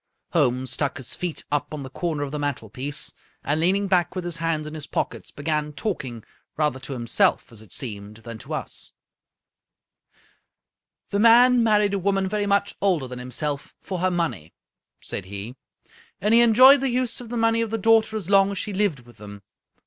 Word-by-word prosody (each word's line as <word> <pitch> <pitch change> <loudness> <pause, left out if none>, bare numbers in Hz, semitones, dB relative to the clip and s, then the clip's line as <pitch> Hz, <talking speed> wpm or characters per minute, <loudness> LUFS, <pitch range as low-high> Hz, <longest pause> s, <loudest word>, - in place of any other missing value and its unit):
Holmes 130 -7 +1
stuck 140 +2 -1
his 130 - -5
feet 180 -3 -4
up 145 0 -1
on 145 - -6
the 130 - -7
corner 155 -2 -2
of 140 - -5
the 150 - -3
mantelpiece, 140 0 -3 0.3
and, 150 +2 0
leaning 190 +5 +2
back 180 -1 +1
with 185 -1 -3
his 175 -2 -3
hands 165 -2 -1
in 150 - -7
his 155 -2 -6
pockets, - - -3
began 150 0 -2
talking, 130 - -4 0.3
rather 150 -4 +1
to 135 +2 -7
himself, 120 -3 +1
as 110 -2 -11
it 110 -5 -17
seemed, 105 -3 -3
than 115 -1 -7
to - - -5
us. - - -6 1.0
" - - -40
The 200 - +1
man 240 +2 +6
married 210 -3 +3
a 200 - 0
woman 195 0 +1
very 205 +1 -1
much 200 0 +1
older 180 -9 +1
than 125 0 -7
him 125 +1 -8
self 145 +2 -4
for 185 -2 -5
her 185 +1 +2
money," 165 - -3 0.5
said - - -4
he, 100 +5 -7 0.3
" - - -28
and 210 +4 +2
he 235 - +7
enjoyed 255 +4 +7
the 270 - +1
use 250 -1 -1
of 240 - -10
the 240 - -3
money 225 0 +2
of 230 - -1
the 225 - -1
daughter 220 0 +3
as 195 -6 -6
long 195 0 +5
as 200 - -4
she 210 - -3
lived 190 -9 0
with 120 -1 -18
them. 100 -1 -10
165 Hz, 200 wpm, -24 LUFS, 130-205 Hz, 1.0 s, he